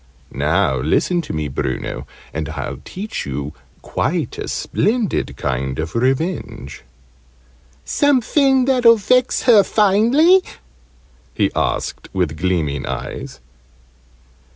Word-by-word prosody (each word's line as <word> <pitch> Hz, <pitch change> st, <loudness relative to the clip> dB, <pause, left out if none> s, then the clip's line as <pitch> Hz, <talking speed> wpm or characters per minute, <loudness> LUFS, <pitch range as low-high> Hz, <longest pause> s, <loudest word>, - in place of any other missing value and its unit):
"Now 65 Hz, -, +1 dB
listen 175 Hz, -, +1 dB
to -, -, -7 dB
me, 75 Hz, -1 st, -2 dB
Bruno, 65 Hz, -1 st, -4 dB, 0.3 s
and 80 Hz, -1 st, -3 dB
I'll 75 Hz, -4 st, -5 dB
teach 210 Hz, +4 st, -5 dB
you 70 Hz, +2 st, -4 dB, 0.3 s
quite -, -, -2 dB
a -, -, -4 dB
splendid 225 Hz, -1 st, -1 dB
kind 65 Hz, 0 st, -2 dB
of 80 Hz, +1 st, -4 dB
revenge!" 130 Hz, -, -2 dB, 1.0 s
"Somefin 270 Hz, -1 st, +3 dB
that'll 245 Hz, -3 st, +5 dB
vex 250 Hz, +5 st, +2 dB
her 225 Hz, -5 st, +7 dB
finely?" 235 Hz, -, +4 dB, 0.9 s
he -, -, +1 dB
asked -, -, -2 dB
with 90 Hz, -5 st, -1 dB
gleaming 80 Hz, -7 st, -1 dB
eyes. -, -, -6 dB
170 Hz, 105 wpm, -19 LUFS, -, 1.0 s, her